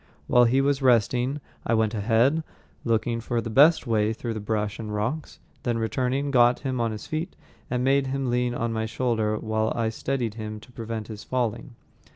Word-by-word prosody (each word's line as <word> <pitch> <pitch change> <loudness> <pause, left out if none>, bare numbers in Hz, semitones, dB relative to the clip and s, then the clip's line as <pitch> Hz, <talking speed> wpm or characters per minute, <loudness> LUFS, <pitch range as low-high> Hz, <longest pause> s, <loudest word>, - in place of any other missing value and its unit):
While 125 0 +5
he 130 +3 +3
was 140 0 +1
resting 125 +3 +2 0.2
I 115 - +1
went 110 -1 +1
ahead, 115 +9 +2 0.4
looking 115 0 0
for 120 +1 -1
the 115 0 -4
best 150 +8 +6
way 110 -2 +1
through 115 +1 -4
the 110 - -4
brush 105 -1 -2
and 110 -2 -5
rocks, 115 +10 -3 0.2
then 120 -2 -1
returning, 130 +5 -1
got 120 -2 +4
him 130 -3 -2
on 115 -1 0
his 110 -1 -7
feet 155 +2 -4 0.3
and 125 0 -1
made 135 +1 +3
him 135 -1 -1
lean 125 0 0
on 115 -1 -1
my 110 0 -1
shoulder 110 -2 0
while 110 0 -1
I 115 -1 0
steadied 120 -1 -2
him 110 -1 -6
to 125 - -16
prevent 115 -2 -5
his 110 -2 -8
falling. 120 -1 -2
115 Hz, 190 wpm, -25 LUFS, 110-130 Hz, 0.4 s, best